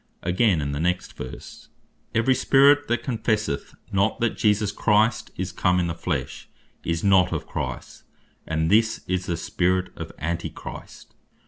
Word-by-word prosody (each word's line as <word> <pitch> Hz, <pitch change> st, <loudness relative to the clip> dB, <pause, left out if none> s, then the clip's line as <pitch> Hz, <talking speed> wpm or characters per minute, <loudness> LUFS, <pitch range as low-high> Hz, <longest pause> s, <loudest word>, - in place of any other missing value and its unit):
Again 90 Hz, -1 st, +2 dB
in 70 Hz, 0 st, -2 dB
the 70 Hz, -, -3 dB
next 90 Hz, +2 st, -1 dB
verse, 65 Hz, -, -9 dB, 0.5 s
"Every 115 Hz, +4 st, +4 dB
Spirit 140 Hz, +3 st, +5 dB
that 120 Hz, +1 st, 0 dB
confesseth 110 Hz, -, -1 dB, 0.2 s
not 100 Hz, +2 st, +1 dB
that 115 Hz, -2 st, 0 dB
Jesus 105 Hz, -1 st, +2 dB
Christ 110 Hz, +2 st, +2 dB
is -, -, -3 dB
come 90 Hz, 0 st, +2 dB
in 90 Hz, -, +1 dB
the 85 Hz, -, -2 dB
Flesh, 80 Hz, -5 st, -4 dB, 0.3 s
is 85 Hz, -1 st, -2 dB
not 95 Hz, -3 st, +4 dB
of -, -, -3 dB
Christ. -, -, -5 dB, 0.5 s
And 80 Hz, +1 st, 0 dB
this 110 Hz, +1 st, +3 dB
is 90 Hz, 0 st, -1 dB
the 85 Hz, -, -1 dB
Spirit 90 Hz, +2 st, 0 dB
of -, -, -7 dB
Antichrist." 85 Hz, +1 st, -6 dB
95 Hz, 150 wpm, -24 LUFS, 85-110 Hz, 0.5 s, Spirit